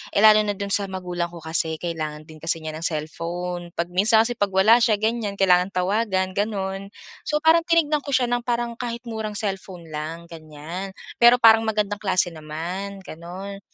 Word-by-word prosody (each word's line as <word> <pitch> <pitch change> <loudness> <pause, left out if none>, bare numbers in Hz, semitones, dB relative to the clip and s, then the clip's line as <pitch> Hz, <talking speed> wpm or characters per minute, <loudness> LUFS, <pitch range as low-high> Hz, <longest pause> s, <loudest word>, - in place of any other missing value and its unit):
Eh, 200 - +3
lalo 215 0 +8
na 205 -1 -1
do'n 200 0 -5
sa 200 0 +3
magulang 180 -2 -3
ko 170 -2 -11
kasi 160 0 0
kailangan 155 -3 -4
din 155 -1 -13
kasi 165 +1 -1
niya 155 - -4
ng 165 +1 -4
cellphone. 170 +3 -5
'Pag 170 +1 -3
minsan 220 +4 +5
kasi 240 - -1
'pag 205 - +2
wala 215 +5 +6
siya, 220 -2 +4
ganiyan 220 -2 -1
kailangan 180 0 +4
tawagan, 190 0 0
gano'n. 195 -2 -2 0.4
So, 300 0 +1
parang 325 +1 +5
tinignan 310 -3 +3
ko 285 - -6
siya 250 -1 +2
ng 245 0 0
parang 240 -1 -1
kahit 240 0 -4
murang 220 -2 -4
cellphone 190 -4 -4
lang, 160 +3 -6
ganiyan. 160 +4 -8 0.3
Pero 240 +1 +8
parang 225 -1 +7
magandang 210 -1 -1
klase 185 -3 +1
naman, 170 +6 -6
gano'n. 185 +5 -8
195 Hz, 185 wpm, -23 LUFS, 170-220 Hz, 0.4 s, lalo